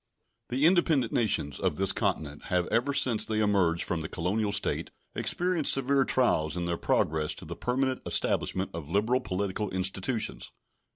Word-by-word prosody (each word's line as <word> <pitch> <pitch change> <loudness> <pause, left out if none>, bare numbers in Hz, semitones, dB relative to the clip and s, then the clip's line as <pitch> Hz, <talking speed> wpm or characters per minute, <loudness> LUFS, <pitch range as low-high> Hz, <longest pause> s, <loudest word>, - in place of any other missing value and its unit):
The 130 +4 +1
independent 160 -8 +3
nations 95 - 0
of - - -1
this - - +3
continent 75 -1 -3
have 90 -3 0
ever 125 +5 +1
since 125 -5 +3
they 110 - -1
emerged 95 -5 +1
from 85 -3 -3
the 80 - -5
colonial 100 +5 -1
state 100 - -1 0.2
experienced 175 -4 +2
severe 135 0 +2
trials 80 - +1
in 85 - -2
their 85 0 -1
progress 75 -2 0
to - - -9
the - - -7
permanent 130 +1 -1
establishment 95 0 0
of 80 -3 -7
liberal 110 +8 +1
political 100 -1 -3
institutions. 95 +5 -2
105 Hz, 160 wpm, -28 LUFS, 85-130 Hz, 0.2 s, independent